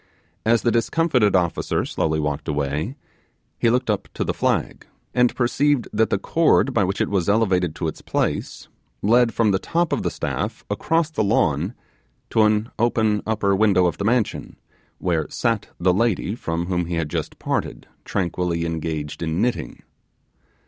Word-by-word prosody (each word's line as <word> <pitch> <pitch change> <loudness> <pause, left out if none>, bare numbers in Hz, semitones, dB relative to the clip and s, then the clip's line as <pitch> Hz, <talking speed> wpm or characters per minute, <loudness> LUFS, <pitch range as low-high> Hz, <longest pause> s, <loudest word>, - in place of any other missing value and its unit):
As 115 0 +3
the 120 - +3
discomfited 115 - +2
officer 90 -2 0
slowly 80 -1 -1
walked 75 0 -2
away, 75 - -2 0.6
he 115 - +3
looked 125 +2 +1
up 105 -3 -1
to - - -1
the - - -1
flag, - - -1 0.3
and 125 -1 +3
perceived 135 +1 +1
that 110 +1 +2
the - - +1
cord 160 -4 +2
by 115 -4 +3
which 95 +2 -1
it - - +1
was 95 -2 0
elevated 95 -6 +2
to 85 - -2
its 80 - -5
place, - - -2 0.4
led 115 +3 +4
from 115 -3 +2
the 95 - +1
top 170 - 0
of - - 0
the - - 0
staff, - - -4
across 165 -1 0
the 110 - 0
lawn, 90 - +1 0.6
to 110 - +3
an 105 +1 +2
open 110 -2 +2
upper 105 -3 +1
window 95 -3 +4
of 85 -2 -1
the - - -1
mansion, 115 0 0 0.4
where 85 -4 -1
sat 115 -3 -1
the 90 +1 +3
lady 105 -1 +1
from 85 -7 -3
whom 90 -1 -1
he 85 - -2
had 80 -2 -1
just - - -4
parted, - - -3 0.2
tranquilly 85 -2 -1
engaged 80 -2 -4
in 80 +1 -1
knitting. 120 +3 -2
100 Hz, 170 wpm, -22 LUFS, 85-115 Hz, 0.6 s, led